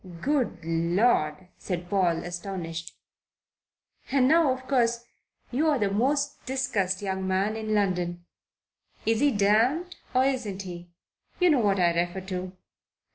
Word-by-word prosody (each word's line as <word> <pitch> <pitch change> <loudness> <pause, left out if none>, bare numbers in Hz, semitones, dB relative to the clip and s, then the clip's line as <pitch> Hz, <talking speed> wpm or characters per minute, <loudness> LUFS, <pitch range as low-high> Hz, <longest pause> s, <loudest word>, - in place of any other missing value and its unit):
"Good 275 - 0
Lord!" 170 0 +1
said 175 -2 -4
Paul, 175 -3 +1
astonished. 175 -2 -6 1.1
"And 260 -1 +3
now, 320 -1 +5
of 260 0 -5
course, 235 -3 +1 0.5
you're 295 +3 +2
the 205 -4 0
most 280 +7 0
discussed 220 -8 -1
young 190 -1 -2
man 195 +3 +1
in 215 -1 -2
London. 175 -3 -1 0.8
Is 225 0 +2
he 290 - +4
damned 240 - +2 0.2
or 255 +1 +4
isn't 225 -8 -2
he? 175 -1 -8 0.5
You 360 -2 +5
know 285 - +4
what 200 -4 +2
I 175 -1 +3
refer 175 +2 -1
to." 185 -1 -5
205 Hz, 130 wpm, -27 LUFS, 180-255 Hz, 1.1 s, now